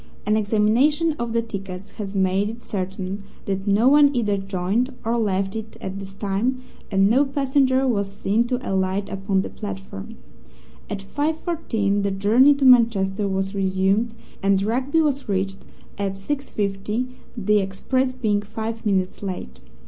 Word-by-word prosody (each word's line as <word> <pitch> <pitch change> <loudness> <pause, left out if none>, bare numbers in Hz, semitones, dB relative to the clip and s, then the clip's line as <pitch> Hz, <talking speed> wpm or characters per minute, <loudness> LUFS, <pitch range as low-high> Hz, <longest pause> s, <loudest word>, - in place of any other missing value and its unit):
An 215 - +2
examination 225 +10 +3
of 235 -1 -2
the 230 0 +1
tickets 195 -4 -7
has 200 -2 -6
made 190 +2 +2
it 230 +2 -9
certain 190 0 -4 0.2
that 195 0 -3
no 205 +5 +4
one 285 0 +6
either 210 -4 +1
joined 195 +6 -1
or 230 +1 +1
left 195 -3 0
it 220 0 -6
at 190 +1 -5
this 195 -1 -8
time, 210 +6 -1 0.3
and 195 -1 +4
no 250 +7 +4
passenger 270 -1 +2
was 200 -5 0
seen 210 +4 0
to 250 0 0
alight 190 +1 0
upon 195 0 0
the - - -5
platform. 195 - -7 0.7
At 200 -1 -4
5:14 290 - -1
the 200 - 0
journey 220 +9 +5
to 275 -1 0
Manchester 215 -5 +4
was 195 0 -1
resumed, 195 +4 +1 0.3
and 195 0 +3
Rugby 260 +9 +1
was 280 -6 -1
reached 195 0 -1 0.4
at 200 -1 -1
6:50, 210 -1 -2 0.3
the 210 -1 +3
express 255 +7 0
being 215 -5 0
five 220 +2 -5
minutes 190 -2 0
late. 180 - -5
205 Hz, 150 wpm, -23 LUFS, 195-240 Hz, 0.7 s, one